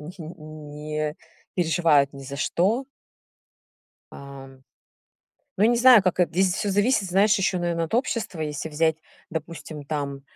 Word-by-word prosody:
не 160 Hz, +5 st, -9 dB, 0.2 s
не 155 Hz, 0 st, -5 dB, 0.4 s
переживают 160 Hz, -5 st, +3 dB
ни 140 Hz, -1 st, -10 dB
за 140 Hz, +1 st, -7 dB
что. 200 Hz, -, +1 dB, 1.3 s
Ам. 135 Hz, -1 st, -11 dB, 0.9 s
Ну, 200 Hz, -, +3 dB
не 240 Hz, +2 st, +4 dB
знаю, 240 Hz, -3 st, +7 dB
как 185 Hz, -1 st, 0 dB
это 180 Hz, -, +2 dB
Здесь 185 Hz, +1 st, +2 dB
всё 205 Hz, -, -1 dB
зависит, 205 Hz, 0 st, +2 dB
знаешь, 205 Hz, +4 st, +4 dB
ещё, 185 Hz, -1 st, +1 dB
наверное, 170 Hz, -1 st, -1 dB
от 165 Hz, -, -5 dB
общества. 230 Hz, -8 st, -1 dB
Если 150 Hz, 0 st, -3 dB
взять, 160 Hz, +1 st, +1 dB, 0.3 s
допустим, 160 Hz, -2 st, -7 dB
там, 140 Hz, -2 st, -4 dB
165 Hz, 140 wpm, -24 LUFS, 150-190 Hz, 1.3 s, знаю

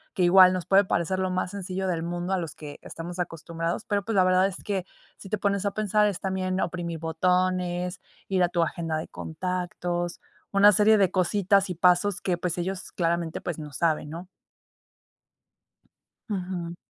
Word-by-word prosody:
que 185 Hz, -, +1 dB
igual 185 Hz, +1 st, +7 dB
nos 180 Hz, -3 st, -3 dB
puede 195 Hz, +1 st, +5 dB
parecer 185 Hz, +1 st, 0 dB
lo 185 Hz, 0 st, 0 dB
más 185 Hz, 0 st, -2 dB
sencillo 190 Hz, -1 st, -4 dB
del 170 Hz, -3 st, -1 dB
mundo, 175 Hz, +2 st, -3 dB
a 190 Hz, -, +1 dB
los 165 Hz, -3 st, -5 dB
que 145 Hz, -2 st, -9 dB
estamos 175 Hz, +2 st, -8 dB
acostumbrados, 165 Hz, +1 st, -3 dB
pero 205 Hz, -2 st, 0 dB
pues, 225 Hz, 0 st, -3 dB
la 185 Hz, -, +5 dB
verdad 185 Hz, +1 st, +4 dB
es 195 Hz, -, -8 dB
que 195 Hz, -3 st, -2 dB, 0.3 s
si 195 Hz, -, -11 dB
te 215 Hz, -, 0 dB
pones 200 Hz, 0 st, 0 dB
a -, -, 0 dB
pensar, 210 Hz, 0 st, +2 dB
es 200 Hz, -, -2 dB
también 185 Hz, -1 st, -2 dB
oprimir 170 Hz, -2 st, -3 dB
botones, 180 Hz, +2 st, 0 dB, 0.3 s
ir 190 Hz, -2 st, +1 dB
a 175 Hz, -, +3 dB
tu 170 Hz, -1 st, +1 dB
agenda 165 Hz, -1 st, -2 dB
de 155 Hz, -, -5 dB
contactos, 175 Hz, 0 st, -3 dB, 0.3 s
una 205 Hz, +1 st, +7 dB
serie 215 Hz, +3 st, +5 dB
de 195 Hz, -3 st, +3 dB
cositas 195 Hz, +1 st, +2 dB
y 180 Hz, -, -3 dB
pasos 180 Hz, +3 st, +3 dB
que, 180 Hz, -2 st, 0 dB
pues, 175 Hz, 0 st, -2 dB
ellos 185 Hz, +2 st, -4 dB
claramente 170 Hz, -1 st, -1 dB
pues 170 Hz, -3 st, -4 dB
no 150 Hz, -2 st, -8 dB
saben 155 Hz, 0 st, 0 dB
¿no? 170 Hz, +3 st, -7 dB, 2.0 s
Ujú. 180 Hz, -4 st, -4 dB
180 Hz, 180 wpm, -26 LUFS, 170-190 Hz, 2.0 s, igual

